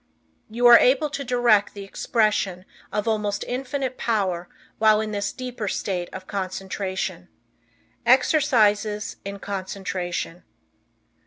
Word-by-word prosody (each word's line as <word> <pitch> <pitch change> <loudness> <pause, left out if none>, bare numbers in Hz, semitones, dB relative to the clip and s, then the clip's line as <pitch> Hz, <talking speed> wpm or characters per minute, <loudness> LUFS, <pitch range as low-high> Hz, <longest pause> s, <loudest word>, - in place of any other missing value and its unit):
You 235 +3 -1
are 240 -1 +10
able 280 +4 +3
to 285 - -3
direct 240 -6 +2
the 200 - -7
expression 195 -3 0 0.3
of 210 +1 -2
almost 210 -2 -1
Infinite 260 0 -3
Power 190 -6 -1 0.3
while 215 -1 +5
in 215 0 -2
this 205 -1 -2
deeper 250 -4 -5
state 180 -2 -2
of 185 0 -8
concentration. 190 0 -4 0.8
Exercises 215 -8 +3
In 200 0 -6
Concentration. 185 -3 -4
210 Hz, 110 wpm, -24 LUFS, 195-240 Hz, 0.8 s, are